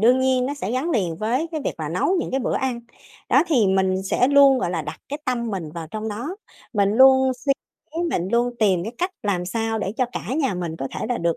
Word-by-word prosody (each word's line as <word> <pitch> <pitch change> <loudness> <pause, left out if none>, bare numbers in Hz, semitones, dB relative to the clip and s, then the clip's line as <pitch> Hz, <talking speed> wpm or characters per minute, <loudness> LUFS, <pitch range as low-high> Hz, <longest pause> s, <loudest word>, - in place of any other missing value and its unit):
đương 250 +4 +5
nhiên 260 -1 +2
nó 285 - -2
sẽ 220 -7 -4
gắn 265 +7 -1
liền 180 - 0
với 240 - 0
cái 310 - -2
việc - - -1
là 155 - -3
nấu 180 - +1
những - - -4
cái 265 - 0
bữa - - -1
ăn, 255 -3 -2 0.5
đó, 270 +4 +5
thì 260 - +3
mình 190 0 +1
sẽ 245 +6 +2
luôn, 280 -2 +6
gọi 175 -8 -1
là, 165 -3 -2
đặt 150 +1 -7
cái 290 - -4
tâm 240 -2 -1
mình 175 -7 -4
vào 165 -1 -6
trong 215 +1 -4
đó, 245 - -5 0.4
mình 200 -3 +2
luôn 265 +2 +6
suy 275 +3 0 0.6
mình 180 - -1
luôn 240 +1 +2
tìm 190 -5 +3
cái 225 - -5
cách 360 +2 0
làm 190 -4 0
sao 225 +2 -1
để 195 -1 -2
cho 255 - +2
cả - - -3
nhà 275 -9 0
mình 170 -3 -4
có 135 -3 -4
thể - - -3
là 245 - -1
được 170 -1 0
230 Hz, 255 wpm, -23 LUFS, 190-265 Hz, 0.6 s, luôn